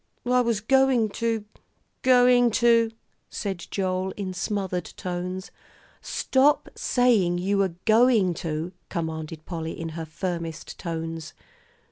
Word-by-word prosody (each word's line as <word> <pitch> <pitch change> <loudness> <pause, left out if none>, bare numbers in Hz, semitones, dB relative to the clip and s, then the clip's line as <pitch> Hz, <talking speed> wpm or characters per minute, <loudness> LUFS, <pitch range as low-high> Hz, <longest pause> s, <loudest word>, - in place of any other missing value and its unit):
"I 250 0 +3
was 230 -3 0
going 265 -2 +3
to 225 -2 0 0.6
going 245 -1 +5
to 230 -1 +4 0.2
" - - -46
said 195 -5 -4
Joel, 185 -1 -1
in 190 -3 -4
smothered 185 -1 -2
tones. 180 +1 -4 0.5
"Stop 275 +3 +2
saying 220 -9 +2
you 195 +3 0
were 190 -4 +1
going 220 -4 +4
to," 165 0 -3 0.2
commanded 160 -1 -4
Polly, 165 -2 -5
in 165 0 -4
her 160 0 -5
firmest 165 0 -5
tones. 165 -2 -5
190 Hz, 120 wpm, -25 LUFS, 170-230 Hz, 0.6 s, going